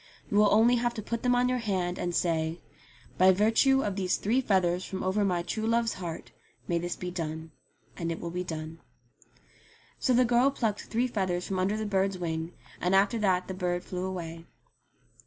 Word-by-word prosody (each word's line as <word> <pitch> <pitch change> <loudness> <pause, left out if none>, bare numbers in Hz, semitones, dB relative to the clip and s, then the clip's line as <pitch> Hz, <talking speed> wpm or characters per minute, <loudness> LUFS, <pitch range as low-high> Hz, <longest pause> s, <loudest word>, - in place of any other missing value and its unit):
You 205 - +2
will 210 -1 +5
only 235 +3 +5
have 240 0 -1
to 215 - -4
put 230 +2 -3
them 245 0 +2
on 245 +1 +3
your 250 0 0
hand, 185 -5 -2
and 175 -1 -2
say, 165 -1 0 0.3
* - - -26
By 185 +1 +7
virtue 225 +7 +3
of 200 -2 -2
these 185 -2 0
three 235 +6 +1
feathers 185 -5 +1
from 190 0 -5
over 190 +3 +1
my 180 -3 0
true 220 +5 -3
love's 230 0 +1
heart 170 -3 -7 0.4
may 170 -1 +1
this 175 +1 -3
be 180 0 -5
done,' 160 -2 -5 0.4
and 170 -1 -3
it 165 - -4
will 170 - -5
be 180 +1 -3
done." 160 -1 -6 1.2
So 255 - +2
the 250 +1 +5
girl 245 +3 +4
plucked 225 -6 -2
three 235 +2 0
feathers 185 -7 -1
from 190 -1 -2
under 195 +3 +1
the 215 - -3
bird's 195 -1 0
wing, 165 -1 -3 0.3
and 180 +2 +2
after 200 +4 +3
that 185 -3 +1
the 190 - -4
bird 180 -1 -2
flew 180 0 -4
away. 170 -3 -6
190 Hz, 205 wpm, -28 LUFS, 175-220 Hz, 1.2 s, By